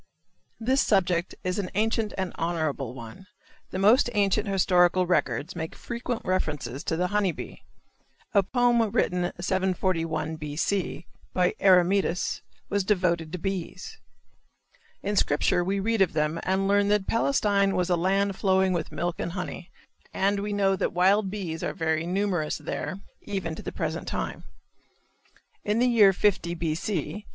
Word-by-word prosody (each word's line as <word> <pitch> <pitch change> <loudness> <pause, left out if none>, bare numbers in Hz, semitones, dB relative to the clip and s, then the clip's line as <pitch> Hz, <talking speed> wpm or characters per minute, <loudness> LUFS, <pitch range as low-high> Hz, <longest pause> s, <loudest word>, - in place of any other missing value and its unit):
This 260 +4 +2
subject 180 -3 +1
is 185 +2 -1
an 185 -3 -3
ancient 220 +1 0
and 190 -2 -2
honorable 155 -7 -2
one. 115 - -10 0.4
The - - -5
most 215 +7 +5
ancient 205 +1 +1
historical 180 -2 +3
records 170 -3 0
make 160 -1 -5
frequent 235 0 -4
reference 160 -6 -1 0.2
to 160 - -1
the 180 - +1
honey 205 -3 +1
bee. - - -9 0.7
A 200 - +6
poem 240 +3 +2
written 180 -2 0
741 175 -4 -1
B. 150 -1 -6
C., 175 0 -1 0.3
by 180 -1 +2
Eremetus 185 -1 +3 0.3
was 200 -1 0
devoted 180 -5 +1
to 180 - -3
bees. 195 - -5 1.1
In 205 +1 -1
Scripture 175 0 +2
we 195 +2 -1
read 225 +1 0
of 190 - +3
them 155 +1 0
and 190 +1 0
learn 200 0 +3
that 205 -1 +2
Palestine 205 -5 +2
was 180 0 0
"a - - +5
land 195 +3 +1
flowing 190 -1 +2
with 165 -3 -3
milk 175 +1 -2
and 170 - -3
honey" 180 -1 -6 0.5
and 200 +1 +1
we 205 +1 -3
know 195 -1 +2
that - - -1
wild 190 +3 +3
bees 180 -5 -4
are - - -2
very 160 -2 -1
numerous 180 -4 0
there 155 +5 -4 0.2
even 190 -5 -4
to - - -7
the - - -5
present - - -3
time. - - -4 1.2
In 210 +1 0
the 245 - +3
year 225 -5 +6
50 180 -3 +1
B. 165 -2 -1
C. 195 +3 -3
190 Hz, 155 wpm, -26 LUFS, 170-205 Hz, 1.2 s, A